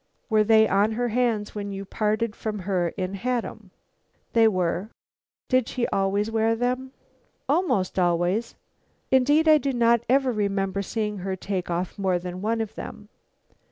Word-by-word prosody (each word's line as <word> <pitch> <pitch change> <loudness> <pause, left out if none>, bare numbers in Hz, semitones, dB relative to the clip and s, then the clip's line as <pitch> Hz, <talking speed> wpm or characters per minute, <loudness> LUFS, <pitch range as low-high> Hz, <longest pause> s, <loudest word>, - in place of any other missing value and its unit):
"Were 215 -1 +5
they 220 0 +5
on 205 +3 +2
her 240 +2 -1
hands 230 -3 0
when 205 -1 -5
you 195 0 -6
parted 215 +2 -1
from 215 -1 -4
her 180 -3 0
in 185 0 -3
Haddam?" 225 -1 -3 0.6
"They 225 -1 +6
were." 185 0 -1 0.6
"Did 255 -2 +2
she 245 -2 -1
always 200 +2 0
wear 225 0 +2
them?" 250 +2 -2 0.6
"Almost 195 - +1
always. 175 +5 +1 0.6
Indeed 290 +5 +4
I 310 -1 +7
do 275 -1 -1
not 235 -1 +3
ever 265 0 +3
remember 200 -2 -1
seeing 210 0 -3
her 190 +1 -3
take 190 -1 -4
off 175 +3 -3
more 190 -2 +1
than 180 +1 -6
one 225 +2 0
of 220 - -5
them." 210 -1 -9
215 Hz, 160 wpm, -25 LUFS, 195-235 Hz, 0.6 s, I